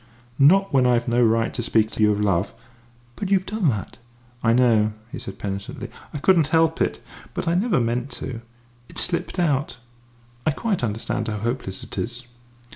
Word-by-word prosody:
"Not 195 +7 +5
when 130 -2 +4
I've 120 -1 +2
no 120 +1 +3
right 115 0 +2
to - - -3
speak 110 -1 +2
to - - -4
you 105 0 +5
of 105 - 0
love?" 100 -2 0 0.6
"But 200 - -4
you've 190 -2 +3
done 210 -6 +1
that!" 105 -2 -4 0.4
"I 115 - +3
know," 115 -3 +4 0.2
he 145 - -6
said 95 0 -8
penitently; 100 -1 -5 0.2
"I - - -5
couldn't 165 0 +4
help 160 0 +2
it. - - 0 0.4
But - - -3
I 165 - +3
never 190 - +2
meant 120 +2 -1
to. 115 -3 -6 0.5
It - - -12
slipped 175 +2 -1
out. 150 -5 0 0.7
I - - +2
quite 195 - -1
understand 115 +1 -2
how 105 -1 -2
hopeless 115 -3 -3
it - - -6
is." 120 +1 -4
125 Hz, 185 wpm, -23 LUFS, 110-160 Hz, 0.7 s, Not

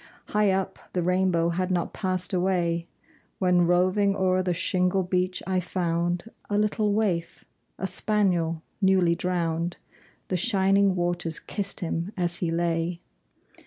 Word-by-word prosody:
High 210 -1 +3
up, 190 0 -1
the 180 - 0
rainbow 180 -2 +2
had 180 +2 -1
not 175 -2 -1
passed 185 -1 -2
away, 175 -2 0 0.5
When, 180 -2 +3
roving 185 +3 +3
o'er 185 -1 +2
the 180 -1 -1
shingle 180 +2 +1
beach, 180 0 -1
I 185 -1 +1
found 175 -1 -1 0.3
A 205 - +1
little 210 0 +1
waif, 185 -6 -1 0.3
a 190 - -3
spaniel 180 -6 0 0.2
newly 190 -3 +4
drowned; 170 -1 -1 0.5
The 185 - +1
shining 195 -2 +3
waters 175 -2 -1
kissed 200 -2 -4
him 170 +3 -3
as 175 -1 -1
he 175 - -1
lay. 170 +1 -1
180 Hz, 135 wpm, -26 LUFS, 170-190 Hz, 0.5 s, newly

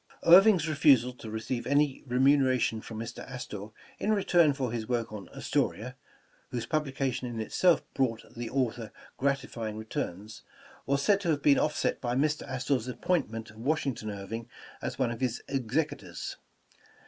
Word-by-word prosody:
Irving 190 +4 +8
's 160 -1 -2
refusal 140 -5 +4
to 115 -3 -9
receive 110 +3 -3
any 140 0 +2
remuneration 130 -3 +3
from 110 - -8
Mr. 115 +1 -6
Astor 105 -5 -6 0.3
in 215 - 0
return 175 -6 +4
for 130 -4 -2
his 115 -1 -4
work 115 -3 -1
on 100 -4 -7
''Astoria," - - -1 0.6
whose 120 -2 -3
publication 135 -3 -1
in 120 -2 -5
itself 170 +10 +3
brought 120 -4 0
the 120 -1 -4
author 120 -4 -1 0.3
gratifying 130 -6 -1
returns, 110 -1 -5 0.5
was 140 +1 +1
said 200 +3 +3
to 175 - -1
have 145 -3 +1
been 140 -1 +5
offset 150 - 0
by 120 -1 -1
Mr. 150 +3 +1
Astor 130 +1 0
'a 125 +1 -6
appointment 115 - -1
of 110 - -17
Washington 130 -3 -1
Irving 110 +4 -6 0.3
as - - -4
one 130 -3 +1
of 120 - -6
his 125 -2 -1
execu 135 +4 -1
tors. - - -7
125 Hz, 160 wpm, -29 LUFS, 115-140 Hz, 0.6 s, Irving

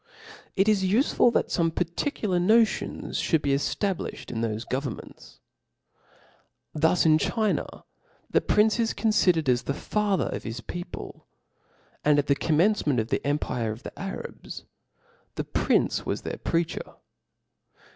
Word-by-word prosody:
It 195 +1 +3
is 210 -3 +3
ufeful 230 +5 +3
that - - +1
fome 165 -2 0
particular 180 - -1
notions 220 +5 +2
fhould 160 -3 +1
be 140 - +2
eftablifhed 185 +7 -2
in 115 -2 -3
thofe 110 0 -3
governments: 130 -3 -6 1.3
thus 160 +3 +2
in 155 -1 +5
China 215 +1 -1 0.4
the - - +2
prince 215 +2 +3
is 225 -1 +1
confidered 180 -8 +2
as 125 -1 +3
the 140 - -3
father 210 +1 0
of - - -4
his 115 +2 -5
people 175 +7 -8 0.4
} - - -36
and 150 -1 +4
at 145 - +2
the 140 - +3
commencement 155 - +2
of 110 +1 -2
the - - -1
empire 130 -6 -1
of 110 +4 -8
die - - -6
Arabs, 195 +1 -7 0.7
the - - -2
prince - - +1
was - - -3
their - - -4
preacher*. 165 -1 -2
170 Hz, 140 wpm, -26 LUFS, 140-210 Hz, 1.3 s, in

